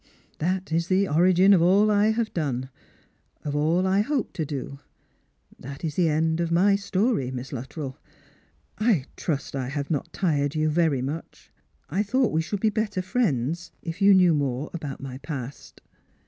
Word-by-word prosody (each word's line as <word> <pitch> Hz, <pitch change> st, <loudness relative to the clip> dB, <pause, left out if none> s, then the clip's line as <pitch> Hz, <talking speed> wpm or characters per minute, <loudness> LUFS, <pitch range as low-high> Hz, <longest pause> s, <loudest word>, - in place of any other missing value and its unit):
That 185 Hz, +3 st, -1 dB
is 165 Hz, +1 st, 0 dB
the 195 Hz, +1 st, +2 dB
origin 185 Hz, +5 st, +5 dB
of 180 Hz, -, +5 dB
all 200 Hz, +5 st, +4 dB
I 205 Hz, +1 st, +4 dB
have 220 Hz, 0 st, -1 dB
done, 130 Hz, -5 st, -2 dB, 0.7 s
of 145 Hz, -1 st, -2 dB
all 160 Hz, +5 st, +2 dB
I 190 Hz, +2 st, +3 dB
hope 270 Hz, +2 st, -1 dB
to 160 Hz, -, -2 dB
do. 140 Hz, -1 st, -5 dB, 0.8 s
That 140 Hz, +4 st, -9 dB
is 155 Hz, -, -2 dB
the 170 Hz, 0 st, +2 dB
end 160 Hz, +1 st, +1 dB
of 170 Hz, -1 st, -1 dB
my 195 Hz, +4 st, +4 dB
story, 200 Hz, -, 0 dB
Miss 130 Hz, +1 st, -6 dB
Luttrell. 135 Hz, +2 st, -6 dB, 0.8 s
I 215 Hz, -, +2 dB
trust 140 Hz, -4 st, -3 dB
I 130 Hz, -2 st, -3 dB
have 140 Hz, +2 st, -4 dB
not 145 Hz, -, -2 dB
tired 145 Hz, -5 st, 0 dB
you 155 Hz, 0 st, +1 dB
very 155 Hz, -5 st, +1 dB
much. 150 Hz, +5 st, -7 dB, 0.4 s
I 185 Hz, +7 st, 0 dB
thought 245 Hz, +4 st, +1 dB
we 160 Hz, -, +1 dB
should 190 Hz, +4 st, -4 dB
be 220 Hz, -, +3 dB
better 210 Hz, -3 st, -1 dB
friends, 170 Hz, -, -1 dB
if 165 Hz, +3 st, -6 dB
you 200 Hz, 0 st, +7 dB
knew 180 Hz, -3 st, +5 dB
more 140 Hz, -1 st, -1 dB
about 145 Hz, -6 st, -6 dB
my 130 Hz, -1 st, -7 dB
past." 140 Hz, -2 st, -7 dB
165 Hz, 175 wpm, -25 LUFS, 140-195 Hz, 0.8 s, you